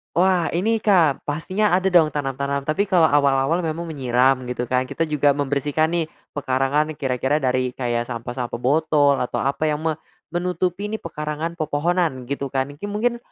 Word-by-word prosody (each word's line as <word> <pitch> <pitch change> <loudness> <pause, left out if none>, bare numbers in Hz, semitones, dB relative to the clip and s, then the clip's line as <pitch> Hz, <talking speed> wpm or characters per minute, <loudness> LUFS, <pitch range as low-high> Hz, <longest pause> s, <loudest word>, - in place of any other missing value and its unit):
Wah, 180 -1 +3
ini, 215 +7 +1
Kak, 180 -10 +2
pastinya 185 +7 0
ada, 190 +1 +3
dong, 165 -4 +4
tanam-tanam, 140 0 -2
tapi 195 +7 +1
kalau 175 -5 +4
awal-awal 140 +4 +2
memang 160 +1 -3
menyiram, 130 -2 +2
gitu, 125 -1 -4
kan, 130 0 +1
kita 165 +5 -2
juga 145 -1 +3
membersihkan, 145 +2 0
nih, 170 -1 0 0.3
pekarangan, 140 +3 0
kira-kira 135 +1 -1
dari 130 -1 0
kayak 120 -2 -1
sampah-sampah 120 0 -5
botol 145 +1 +3
atau 125 - -2
apa 140 +3 0
yang 150 -1 0
me 160 -2 -1 0.3
menutupi, 180 +2 -2
nih, 220 +1 -4
pekarangan 155 +1 -4
pepohonan, 155 -3 -1
gitu, 140 0 -2
kan, 135 0 0
kin 205 +6 -6
mungkin 240 +3 0
150 Hz, 160 wpm, -22 LUFS, 135-170 Hz, 0.3 s, dong